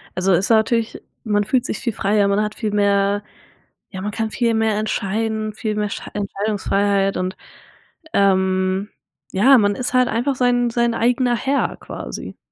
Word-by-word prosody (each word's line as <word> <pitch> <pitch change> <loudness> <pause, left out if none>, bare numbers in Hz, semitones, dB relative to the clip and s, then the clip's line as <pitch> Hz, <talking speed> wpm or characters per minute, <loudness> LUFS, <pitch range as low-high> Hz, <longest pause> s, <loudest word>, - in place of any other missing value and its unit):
Also, 185 +1 +1
es 180 +4 +2
ist - - -5
natürlich 225 0 +2 0.2
man 205 -2 +1
fühlt 245 +4 0
sich - - -3
viel 235 -4 -3
freier, 200 +1 +1
man 200 +1 +2
hat 210 0 -4
viel 215 -2 -3
mehr 200 0 +2 0.7
ja, 190 - -7
man 205 +2 -3
kann 220 +1 -3
viel 235 -2 +1
mehr 220 -1 +1
entscheiden, 215 +1 -2
viel 215 0 -3
mehr 210 -1 -1
schei - - -6
Entscheidungsfreiheit, 200 -1 0
und, 185 +1 -3 0.8
ähm, 190 0 +2 0.4
ja, 250 +7 +6
man 205 -1 +2
ist 250 +2 -4
halt 255 0 +4
einfach 250 +4 -1
sein 245 -1 +2
sein 235 0 +1
eigener 245 +1 +2
Herr 275 +3 -1
quasi. - - -8
210 Hz, 170 wpm, -20 LUFS, 200-235 Hz, 0.8 s, ja